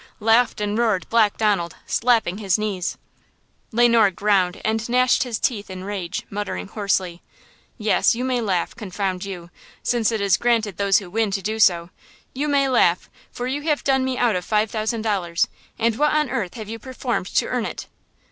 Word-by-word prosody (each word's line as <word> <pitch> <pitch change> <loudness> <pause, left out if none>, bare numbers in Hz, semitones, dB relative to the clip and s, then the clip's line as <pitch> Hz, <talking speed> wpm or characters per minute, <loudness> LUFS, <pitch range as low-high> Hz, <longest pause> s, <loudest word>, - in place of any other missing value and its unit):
laughed 225 +2 +3
and 210 +1 -1
roared 215 -7 +1
Black 220 -3 +3
Donald, 200 -6 +1
slapping 225 -5 +1
his 195 -4 +1
knees. 205 -4 -3 0.7
Le 240 +1 +4
Noir 230 -3 +5
ground 195 -1 +1
and 220 +1 -1
gnashed 250 +1 +3
his 240 -4 -1
teeth 215 -6 -2
in 185 0 -7
rage, 195 -3 -4
muttering 195 - -4
hoarsely: 190 -4 -1 0.6
"Yes, 215 0 +2
you 245 - -3
may 255 -2 0
laugh, 185 -6 -1
confound 195 -3 -3
you, 180 -3 -7 0.3
since 235 -2 +1
it 220 - -1
is 200 -1 +3
granted 225 -6 +1
those 200 -1 +3
who 185 -4 -5
win 220 +1 +1
to 195 -1 -3
do 220 +2 -2
so! 175 -4 +3 0.4
You 285 +3 -2
may 280 -2 +2
laugh; 185 -9 +2 0.2
for 245 - -5
you 270 +3 -2
have 300 -1 0
done 265 -1 +2
me 260 -1 -1
out 240 -4 +2
of 180 - -2
five 210 +2 0
thousand 220 0 -2
dollars, 180 -6 0 0.3
and 230 -1 +1
what 300 +2 +2
on 300 -4 +1
earth 210 -9 -3
have 220 -3 -7
you 225 +1 -6
performed 250 -5 -3
to - - +3
earn 245 -3 -1
it?" - - -7
215 Hz, 190 wpm, -22 LUFS, 195-240 Hz, 0.7 s, Noir